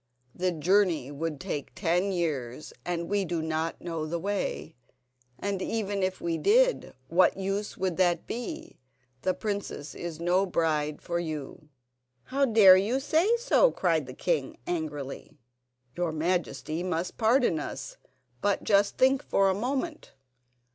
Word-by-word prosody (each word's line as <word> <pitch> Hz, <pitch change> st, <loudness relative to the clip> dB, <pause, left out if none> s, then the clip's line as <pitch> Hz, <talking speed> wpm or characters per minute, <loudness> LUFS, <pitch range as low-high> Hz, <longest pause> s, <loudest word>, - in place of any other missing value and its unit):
"The 185 Hz, 0 st, 0 dB
journey 170 Hz, -4 st, +2 dB
would 150 Hz, 0 st, -4 dB
take 175 Hz, -7 st, -5 dB
ten 180 Hz, +2 st, +1 dB
years, 155 Hz, -7 st, -3 dB
and 170 Hz, -1 st, -2 dB
we 205 Hz, 0 st, +1 dB
do 170 Hz, -2 st, -2 dB
not 160 Hz, +1 st, -2 dB
know 165 Hz, -3 st, -3 dB
the 170 Hz, +2 st, -2 dB
way. 195 Hz, -3 st, -3 dB, 0.6 s
And 200 Hz, -1 st, -2 dB
even 205 Hz, -2 st, -2 dB
if 185 Hz, 0 st, -1 dB
we 170 Hz, -1 st, -2 dB
did, -, -, +3 dB
what 180 Hz, +3 st, +4 dB
use 195 Hz, +2 st, -3 dB
would 185 Hz, -3 st, -1 dB
that 175 Hz, -3 st, +2 dB
be? 280 Hz, +7 st, -6 dB, 0.4 s
The 185 Hz, +6 st, 0 dB
princess 200 Hz, -8 st, -4 dB
is 170 Hz, -2 st, -6 dB
no 180 Hz, +3 st, +2 dB
bride 155 Hz, -4 st, 0 dB
for 170 Hz, 0 st, -1 dB
you." 155 Hz, -2 st, -6 dB, 0.5 s
"How 275 Hz, +1 st, +1 dB
dare 210 Hz, -6 st, +8 dB
you 220 Hz, +8 st, +1 dB
say 330 Hz, -, +2 dB
so?" -, -, +4 dB
cried 165 Hz, -, 0 dB
the 130 Hz, -, -8 dB
king 155 Hz, -5 st, -1 dB
angrily. 150 Hz, -5 st, -5 dB, 0.6 s
"Your 175 Hz, -2 st, -1 dB
Majesty 165 Hz, 0 st, -1 dB
must 180 Hz, -1 st, -3 dB
pardon 230 Hz, -, +3 dB
us; -, -, -6 dB, 0.4 s
but 200 Hz, -1 st, +1 dB
just 200 Hz, -1 st, +3 dB
think 265 Hz, +1 st, +4 dB
for 195 Hz, -1 st, +3 dB
a -, -, +1 dB
moment. 265 Hz, -, -3 dB
180 Hz, 145 wpm, -28 LUFS, 160-205 Hz, 0.6 s, dare